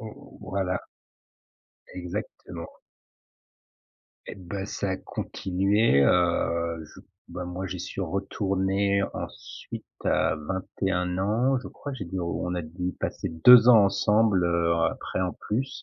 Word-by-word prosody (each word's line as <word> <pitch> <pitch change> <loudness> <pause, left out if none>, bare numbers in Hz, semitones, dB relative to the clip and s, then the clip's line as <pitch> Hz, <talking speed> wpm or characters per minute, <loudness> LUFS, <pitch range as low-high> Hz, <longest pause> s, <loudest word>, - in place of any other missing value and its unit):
Ou 110 -1 -11
voilà. 95 -1 0 1.2
Exactement. 90 -1 -6 1.6
Et - - -6
ben 95 +1 -6
ça 100 -1 -3
a 95 - -1
continué, 95 -3 +1
heu, 85 0 +1
je - - -14 0.3
bah, 90 - -6
moi 90 +2 -5
j'y 90 -1 -5
suis 95 - -6
retourné 95 +1 0
ensuite - - -8 0.2
à - - +2
21 90 +2 -2
ans. 115 +7 +2
Je 125 - -8
crois, 145 - -8
j'ai 115 -7 -5
dû 95 +2 -4
on 90 +1 -2
a 90 - -2
du 90 +3 -4
passer - - -3
2 115 +9 +8
ans 110 -4 +8
ensemble, 100 0 +3
heu, 85 -1 +2 0.2
après - - -5
en 90 -1 0
plus 130 +6 -3
95 Hz, 130 wpm, -26 LUFS, 90-100 Hz, 1.6 s, 2